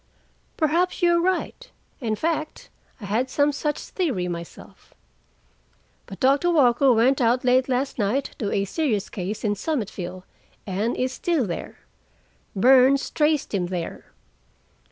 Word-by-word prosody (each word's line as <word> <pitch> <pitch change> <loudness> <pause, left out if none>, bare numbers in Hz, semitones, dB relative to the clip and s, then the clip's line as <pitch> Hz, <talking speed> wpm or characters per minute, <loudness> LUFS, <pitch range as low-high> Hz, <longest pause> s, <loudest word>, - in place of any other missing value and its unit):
"Perhaps 345 +4 0
you 345 - +5
are 340 0 +3
right. 375 +7 -2 0.3
In 225 -5 -1
fact, 310 +4 -3 0.3
I 210 - -8
had 230 +6 -1
some 290 +2 +2
such 295 +1 -2
theory 265 - -2
myself. 170 -1 -9 1.1
But 195 - -10
Doctor 275 +6 +3
Walker 270 -4 +4
went 250 +4 +3
out 245 +2 +2
late 255 +1 +3
last 260 +1 -1
night 230 +7 -1
to 205 -4 -2
a 200 -1 0
serious 215 - -1
case 195 +2 -5
in 210 -2 +1
Summitville, 200 - -4 0.4
and 205 +4 -2
is 255 0 -1
still 325 -6 0
there. 175 -4 -6 0.7
Burns 260 +5 +4
traced 300 -4 +1
him 180 -3 0
there. 175 -2 -5
255 Hz, 135 wpm, -24 LUFS, 205-300 Hz, 1.1 s, you